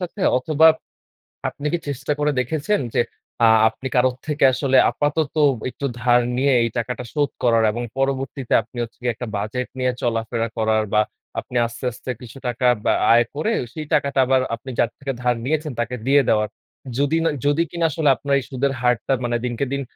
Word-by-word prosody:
সাথে? 180 +3 -6 0.2
অথবা 155 +4 +3 0.8
আপনি 145 - -10
কি - - +3
চেষ্টা 140 0 -3
করে 150 0 +2
দেখেছেন 155 - 0
যে - - +3 0.4
আ - - +7 0.2
আপনি 120 +4 -7
কারো 125 +1 +4 0.2
থেকে 150 -1 -1
আসলে 135 0 +2
আপাতত 145 +1 -1 0.3
একটু 140 - -6 0.2
ধার 120 0 +4 0.2
নিয়ে 135 +1 +3
এই 115 - 0
টাকাটা 125 +2 -3
শোধ 145 -3 +1
করার 115 -2 +4
এবং 120 +3 -4
পরবর্তীতে 135 -1 -1
আপনি 125 - -15
হচ্ছে 115 - -9
গিয়ে 120 -1 0
একটা 125 - -6
বাজেট 110 +5 -3
নিয়ে 130 0 +2
চলাফেরা 115 0 -1
করার 110 -1 +2
বা 105 - +5 0.4
আপনি 125 - -5
আস্তে, 115 +2 -8
আস্তে, 120 - -10
কিছু 125 +2 -11
টাকা 125 +1 0 0.2
বা - - +4 0.2
আয় 120 +1 +5
করে 155 +10 0 0.2
সেই 155 -1 -5
টাকাটা 140 -1 +1
আবার 130 0 +3
আপনি 125 +3 -11
যার 115 - +3
থেকে 135 -1 -3
ধার 125 0 +2
নিয়েছেন 155 +2 -1
তাকে 120 +1 -1
দিয়ে 140 +1 +6
দেওয়ার। 105 -1 +2 0.5
যদি 145 +3 +2
না 165 - +3 0.2
যদি 145 +3 +3
কিনা 170 -1 0
আসলে 150 0 +1
আপনার 140 +2 0
এই - - -7
সুদের 135 +1 0
হারটা 125 +2 +1
মানে 120 0 0
দিনকে 120 +2 -1
দিন 140 - -1
130 Hz, 190 wpm, -22 LUFS, 120-145 Hz, 0.8 s, আ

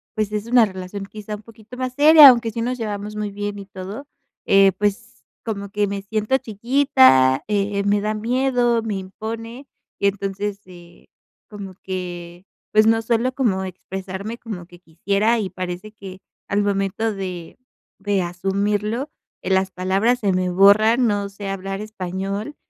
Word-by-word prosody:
pues 215 -1 -1
es 210 0 -3
una 240 -1 +5
relación 190 +1 -7
quizá 210 +1 -7
un 210 - -11
poquito 225 +1 -14
más 255 0 -3
seria, 300 0 +10
aunque 235 -3 +2
sí 230 - -4
nos 250 +2 -2
llevamos 210 -2 -5
muy 210 -1 -3
bien 205 0 -5
y 195 - -8
todo, 195 +8 -8 0.4
eh, 195 0 +5
pues 210 +3 -3 0.2
como 200 -3 -4
que 205 +1 0
me 200 0 -4
siento 215 +5 0
chiquita, 205 - +3
eh, 200 -1 0
me 205 +1 +2
da 215 +1 -1
miedo, 240 +1 +1
me 220 -2 -3
impone 225 +7 -7 0.3
y 200 - +2
entonces, 200 +1 -3
eh, 175 -2 -16 0.4
como 200 -3 -8
que 175 -1 -6 0.3
pues 215 0 +5
no 225 0 +3
suelo 235 +3 0
como 220 -8 0
expresarme 190 +4 -7
como 205 -8 -8
que 175 -1 -16
quisiera 200 +7 0
y 200 -3 -2
parece 185 +3 -6
que 190 -3 -10 0.3
al 200 +1 +1
momento 200 +2 -1
de 185 -4 -7 0.4
de 200 -1 0
asumirlo, 205 - -2 0.3
las 190 0 +1
palabras 195 +7 +1
se 200 -4 +1
me 185 0 0
borran. 215 +6 +5
No 205 -2 -1
sé 200 0 -8
hablar 195 +1 -4
español 200 +4 -5
205 Hz, 160 wpm, -21 LUFS, 190-225 Hz, 0.4 s, seria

